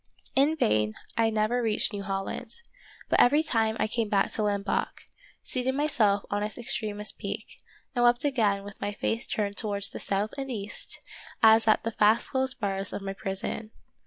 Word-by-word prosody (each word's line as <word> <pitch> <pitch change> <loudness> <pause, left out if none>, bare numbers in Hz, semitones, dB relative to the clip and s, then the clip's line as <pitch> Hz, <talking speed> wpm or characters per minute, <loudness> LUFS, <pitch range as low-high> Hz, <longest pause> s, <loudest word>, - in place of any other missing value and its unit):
In 285 +4 +4
vain, 105 - +2
— - - -28
I 225 -1 +3
never 220 +3 +1
reached 225 0 0
New 200 - -3
Holland, 195 - -4 0.5
but - - +2
every 295 +5 +5
time 225 -6 +1
I - - +3
came 220 0 -1
back 200 -1 +2
to - - -2
Lamboc, 205 -1 -1 0.4
seated 255 +1 -1
myself 225 -9 +2
on 205 0 0
its 210 -1 -3
extremest 215 -3 -2
peak, - - -6 0.3
and 245 -2 +1
wept 240 +3 +4
again 215 -8 +2
with 200 0 -11
my 205 - -2
face 225 +3 -1
turned 205 -1 -2
towards 200 -2 +1
the - - -7
south 200 +2 -1
and 270 0 -4
east, 210 -4 -3 0.4
as 220 0 +7
at 215 - +4
the 230 - -1
fast 215 +1 +3
closed 265 0 -1
bars 195 -3 -2
of 200 - -4
my 195 0 -3
prison. 195 +3 -4
215 Hz, 185 wpm, -28 LUFS, 200-240 Hz, 0.5 s, as